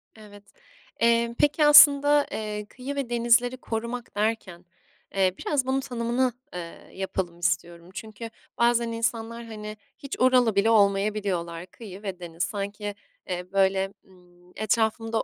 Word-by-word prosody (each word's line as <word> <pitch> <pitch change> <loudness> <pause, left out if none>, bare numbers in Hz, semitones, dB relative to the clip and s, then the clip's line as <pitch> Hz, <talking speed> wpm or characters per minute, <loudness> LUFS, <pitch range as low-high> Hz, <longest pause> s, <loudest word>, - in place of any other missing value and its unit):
Evet. 205 -2 -14 0.6
Eee, 235 0 +2
peki 295 +1 +3
aslında, 290 0 +7
eee, 210 -1 -4
kıyı 265 +3 -7
ve 275 -4 -3
denizleri 240 +1 +2
korumak 235 0 -5
derken, 205 -5 -2 0.5
eee, 190 -1 +2
biraz 285 -4 -1
bunun 265 +1 0
tanımın, 245 -1 -1 0.2
eee, 170 -1 -9
yapalım 190 -2 -4
istiyorum. 170 0 -2
Çünkü 220 +2 -8 0.3
bazen 235 0 +2
insanlar, 230 0 -3
hani, 215 -1 -8 0.2
hiç 280 -1 -7
oralı 250 -4 +4
bile 200 +3 +3
olmayabiliyorlar. 200 -5 +1
Kıyı 200 -1 -11
ve 190 -3 -5
deniz. 170 -1 -5
Sanki, 205 0 -4 0.3
eee, 180 0 -5
böyle, 195 0 +1
ımm, 180 -1 -23
etrafımda 225 +1 0
220 Hz, 130 wpm, -25 LUFS, 195-235 Hz, 0.6 s, aslında